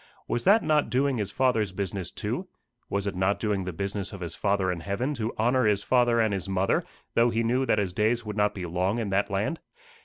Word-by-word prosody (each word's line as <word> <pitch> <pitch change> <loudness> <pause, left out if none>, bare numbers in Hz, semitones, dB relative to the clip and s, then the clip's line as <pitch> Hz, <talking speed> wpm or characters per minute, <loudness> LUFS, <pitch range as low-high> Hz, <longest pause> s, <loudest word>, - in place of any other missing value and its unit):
Was 120 - -1
that 205 +4 +6
not 150 -1 +2
doing 135 0 +1
his 100 -2 -1
Father's 115 -4 +1
business 95 -1 -3
too? - - -4 0.4
Was 100 0 -1
it 100 - -2
not 95 +2 +1
doing 105 -4 -1
the 90 - -3
business 100 +2 -3
of 100 - -9
his 85 - -4
Father 100 -2 +1
in 90 - -3
heaven 100 - -2
to 115 -3 -2
honour 125 +2 +2
his 100 -2 +2
father 120 -1 +3
and 110 -2 +2
his 95 0 -3
mother, 95 0 +1 0.3
though 120 +1 +4
he 115 0 0
knew 125 +3 +1
that - - +3
his 100 -4 -1
days 115 +4 +1
would 105 -1 -5
not 105 -1 +1
be 90 -3 -4
long 90 +5 0
in 110 -4 -2
that 100 +1 +1
land? 105 +12 -1
105 Hz, 235 wpm, -27 LUFS, 95-120 Hz, 0.4 s, that